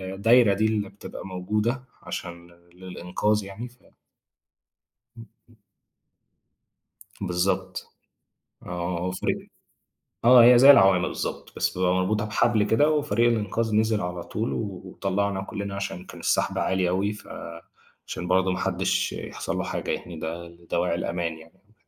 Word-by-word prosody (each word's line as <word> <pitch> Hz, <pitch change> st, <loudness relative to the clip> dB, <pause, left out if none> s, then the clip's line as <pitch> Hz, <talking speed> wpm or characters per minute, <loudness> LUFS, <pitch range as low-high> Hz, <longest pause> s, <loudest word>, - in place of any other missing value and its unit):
الدايرة 115 Hz, +1 st, +5 dB
دي 110 Hz, +3 st, +1 dB
اللي 105 Hz, -3 st, 0 dB
بتبقى 100 Hz, -, -10 dB
موجودة 105 Hz, +7 st, -2 dB, 0.2 s
عشان 85 Hz, -1 st, -7 dB
ل 85 Hz, 0 st, -23 dB
للإنقاذ 95 Hz, +3 st, -1 dB
يعني. 100 Hz, +5 st, -8 dB
ف 125 Hz, -, -24 dB, 1.4 s
امم، 115 Hz, 0 st, -11 dB, 0.2 s
امم. 115 Hz, -, -23 dB, 1.6 s
بالضبط. 95 Hz, 0 st, -1 dB, 0.8 s
آه، 90 Hz, 0 st, -3 dB
وفريق 90 Hz, 0 st, -1 dB, 0.9 s
آه، 120 Hz, 0 st, +9 dB
هي 120 Hz, 0 st, +8 dB
زي 135 Hz, +3 st, +9 dB
العوامة 95 Hz, -8 st, +6 dB
بالضبط، -, -, -5 dB
بس -, -, -1 dB
بيبقى 90 Hz, 0 st, +2 dB
مربوطة 100 Hz, +3 st, 0 dB
بحبل 110 Hz, +1 st, +2 dB
كده، 145 Hz, +9 st, +3 dB
وفريق 130 Hz, -6 st, +2 dB
الإنقاذ 110 Hz, 0 st, 0 dB
نزل 110 Hz, -1 st, +2 dB
على 90 Hz, 0 st, -4 dB
طول 110 Hz, +2 st, -3 dB
وطلّعنا 95 Hz, -1 st, -2 dB
كلّنا، 100 Hz, 0 st, -5 dB
عشان 95 Hz, -2 st, -5 dB
كان -, -, -11 dB
السحب -, -, 0 dB
عالي 95 Hz, -1 st, +1 dB
أوي، 95 Hz, +3 st, 0 dB
ف 105 Hz, -, -12 dB, 0.8 s
عشان 90 Hz, -, -5 dB
برضو 95 Hz, 0 st, +3 dB
ما 90 Hz, -, -3 dB
حدّش -, -, 0 dB
يحصل -, -, -5 dB
له -, -, -1 dB
حاجة -, -, -4 dB
يعني، 90 Hz, -2 st, -4 dB
ده 85 Hz, +2 st, -5 dB
لدواعي 85 Hz, 0 st, -2 dB
الأمان 85 Hz, -1 st, -3 dB
يعني. 95 Hz, +6 st, -20 dB
95 Hz, 135 wpm, -25 LUFS, 90-110 Hz, 1.6 s, آه